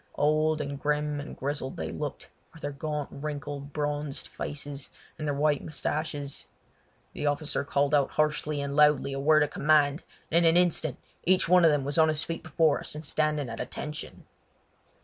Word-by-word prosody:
Old 155 +1 +2
and 140 -1 -4
grim 150 0 0
and 145 - -8
grizzled 140 -1 -3
they - - -3
looked, - - -5 0.3
with 165 - -15
their 145 - -2
gaunt, 150 0 -3
wrinkled, 145 -1 -5
bronzed 145 -1 -3
faces 145 -1 -6 0.3
and 155 - -3
their 145 - 0
white 145 0 +2
moustaches. 145 -1 -3 0.7
The 150 - -2
officer 145 +1 0
called 140 +1 +1
out 140 -2 +4
harshly 150 -1 0
and 140 0 -3
loudly 150 -2 +4
a 135 - -3
word 155 +2 +5
of 150 - -2
command, 150 0 +3 0.3
and 170 +2 +4
in 165 - +7
an 165 - +4
instant 160 -5 +2 0.3
each 185 0 +3
one 180 +1 +6
of 165 - +8
them 145 -2 +2
was 145 +4 0
on 160 0 +6
his 155 0 0
feet 165 - -4
before 160 -3 +2
us - - -3
and 155 +1 -6
standing 150 -1 0
at 115 -1 -6
"attention!" 150 +4 -6
150 Hz, 185 wpm, -28 LUFS, 145-155 Hz, 0.7 s, of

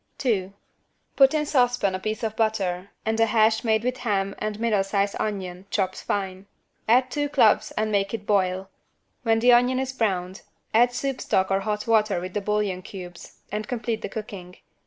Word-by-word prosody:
2. 200 -8 0 0.6
Put 270 +2 +5
in 300 -1 +1
saucepan 245 -8 +2
a 185 - -2
piece 215 +4 -4
of 220 -1 -2
butter 195 -4 -1 0.2
and 220 +1 0
a 225 - +4
hash 220 0 +3
made 220 -1 +2
with 250 +1 -1
ham 195 -4 -1
and 215 0 -2
a - - -12
middle 220 -4 +2
sized 200 0 0
onion, 190 -3 -4
chopped 190 -2 -1
fine. 190 -1 -3 0.4
Add 250 +3 +4
two 290 -1 -1
cloves 255 -7 +4
and 215 0 0
make 200 -1 +1
it 220 -3 -5
boil. 190 -2 +1 0.5
When 225 -2 +2
the 245 +2 +5
onion 245 +2 +4
is 265 0 -2
browned 190 -6 -1 0.3
add 240 +2 +5
soup 270 +1 -3
stock 190 0 +1
or 195 - +3
hot 210 +1 -3
water 215 -4 +2
with 180 +1 -6
bouillon 210 -3 -1
cubes 180 -2 -10
and 210 +1 -3
complete 230 -3 -3
the - - -4
cooking. 195 -4 -8
215 Hz, 185 wpm, -25 LUFS, 195-230 Hz, 0.6 s, Put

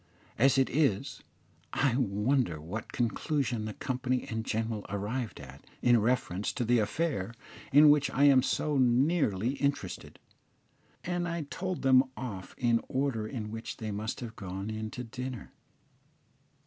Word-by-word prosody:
As 135 0 +5
it 135 - +4
is, 135 -9 0 0.5
I 135 -4 +2
wonder 115 - +1
what 95 +9 -6
conclusion 120 0 -1
the 110 - -5
company 130 -1 -2
in 110 0 -2
general 110 -1 -2
arrived 105 +4 -3
at 70 -1 -11 0.2
in 120 -1 +6
reference 105 -4 0
to 120 - -2
the 120 +1 +4
affair 115 - -1 0.4
in 145 +2 +8
which 145 -1 +3
I 140 - +1
am 140 -2 +7
so 150 +2 0
nearly 125 - +2
interested, 140 -10 -2 0.9
and 175 0 -1
I 170 -2 -2
told 185 -3 -3
them 130 -1 +6
off 105 -7 -6
in 120 -2 +3
the - - -4
order 130 -5 -1
in 110 -3 -5
which 115 0 -6
they 110 -1 -4
must 110 +4 -4
have 115 -2 -7
gone 95 +2 -5
in 110 0 -4
to 125 - -6
dinner. 125 0 -6
120 Hz, 150 wpm, -30 LUFS, 110-135 Hz, 0.9 s, in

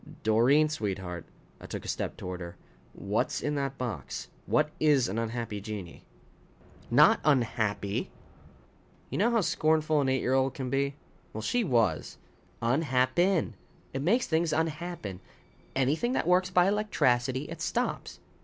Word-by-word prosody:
"Doreen, 120 +8 +4
sweetheart 95 - -4 0.2
" - - -28
I - - -9
took - - -6
a - - -7
step - - -3
toward 90 -1 -5
her 85 0 -8 0.4
"what's 100 +3 -1
in 150 - -2
that 140 -1 -2
box? 125 -4 -5 0.2
What 150 0 +2
is 145 -5 +4
an 100 +5 -2
unhappy 115 -2 -3
genii?" 100 -4 -7 0.9
"Not - - +6
unhappy." 110 -8 0 1.0
You - - -2
know 220 +4 +4
how 235 -2 +2
scornful 155 -3 +2
an 135 - +1
eight 130 0 +1
year 130 - 0
old 135 0 +2
can 130 -2 -4
be? 140 0 0 0.4
Well, 110 - -5
she 245 - +1
was. 115 - +1 0.5
"Unhap 130 0 +2
pen. 175 -7 +2 0.4
It 135 - -2
makes 225 - +2
things 160 0 +1
unhappen. 160 - -3 0.6
Anything 145 - +1
that - - 0
works 180 +1 +3
by 180 -1 +4
electracity, 130 - +1
it 160 +1 -8
stops. 245 +9 -2
135 Hz, 150 wpm, -29 LUFS, 115-160 Hz, 1.0 s, Not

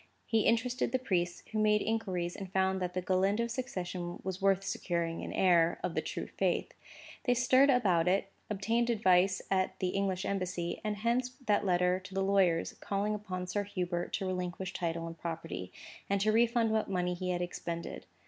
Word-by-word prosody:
He 225 -2 +2
interested 245 +2 +1
the 260 - +2
priests, 175 -8 -1
who 220 - -1
made 210 0 +3
inquiries 185 -6 -1
and 195 -2 -7
found 190 0 +1
that 180 0 -3
the 185 - -1
Galindo 195 +5 +2
succession 185 -8 -4
was 190 0 -4
worth 195 0 +3
securing 170 -3 -2
to - - -5
an - - -5
heir 170 -2 +3
of - - -1
the - - 0
true - - -4
faith. - - -1 0.5
They 245 -2 +3
stirred 255 +3 +5
about 190 -10 +3
it, 195 +1 +1 0.2
obtained 225 +4 0
advice 190 -4 +3
at 185 0 +1
the 185 - 0
English 190 -1 -1
Embassy; 180 -3 -2
and 210 -1 -1
hence 235 +4 +1 0.2
that 205 -2 +2
letter 180 0 +3
to 190 +1 -11
the 195 - +1
lawyers, 190 -4 +2
calling 205 +1 -1
upon 190 -3 -4
Sir 205 +3 -1
Hubert 180 -3 -3
to 195 - -1
relinquish 180 0 -3
title 165 -1 -2
and 165 0 -8
property, 90 - -5 0.4
and 200 0 +2
to 215 +1 +3
refund 230 0 +3
what 220 -2 0
money 180 -2 0
he 180 +1 -4
had 180 0 0
expended. 170 -1 -5
190 Hz, 185 wpm, -32 LUFS, 180-215 Hz, 0.5 s, stirred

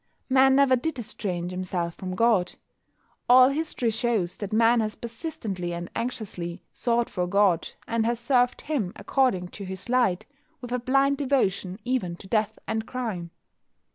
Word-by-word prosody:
Man 265 0 +6
never 275 -2 +5
did 275 +4 -2
estrange 185 -6 -4
himself 180 -2 -3
from 185 +1 -6
God. 210 -4 +3 0.8
All 255 +1 +8
history 275 -5 -1
shows 220 -6 0
that 205 -1 -5
Man 230 +2 +4
has 215 -1 -1
persistently 225 - -5
and 175 +1 -6
anxiously 195 -7 -4
sought 235 -1 +1
for 180 -1 -2
God, 190 -3 +2 0.2
and 230 -1 +1
has 235 0 0
served 245 0 +2
Him, 255 -12 -2
according 200 -10 +1
to 200 - -9
his 190 +3 -8
light, 240 -8 +2 0.3
with 245 -2 -8
a 250 - 0
blind 275 +3 +2
devotion 200 -9 0
even 245 -9 -1
to 180 - -14
death 215 +1 0
and 220 0 -2
crime. 220 -9 -4
225 Hz, 155 wpm, -26 LUFS, 185-250 Hz, 0.8 s, All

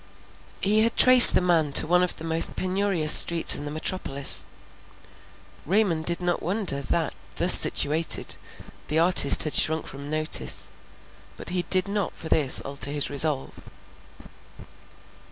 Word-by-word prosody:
He 210 +2 0
had 230 +1 -3
traced 255 -1 +7
the - - 0
man 165 -5 -3
to - - +4
one 180 +2 -1
of 180 - -3
the - - -14
most 165 0 +2
penurious 185 -4 -2
streets 170 -1 +5
in 145 - -9
the - - -8
metropolis. 145 -3 +1 1.2
Raymond 175 -3 -3
did 170 0 -1
not 175 -1 -5
wonder, 180 -7 -3
that, 135 - -5 0.2
thus - - +4
situated, 155 +3 -1 0.5
the 155 - -5
artist 165 -4 +4
had 155 - -7
shrunk 160 0 -1
from 140 +1 -12
notice, 155 0 -2 0.7
but - - -12
he 180 -1 -4
did 185 0 +1
not 200 -2 -6
for 160 - -12
this 140 -5 0
alter 140 0 -4
his 145 -1 -4
resolve. 145 -1 -3
165 Hz, 145 wpm, -21 LUFS, 150-185 Hz, 1.2 s, traced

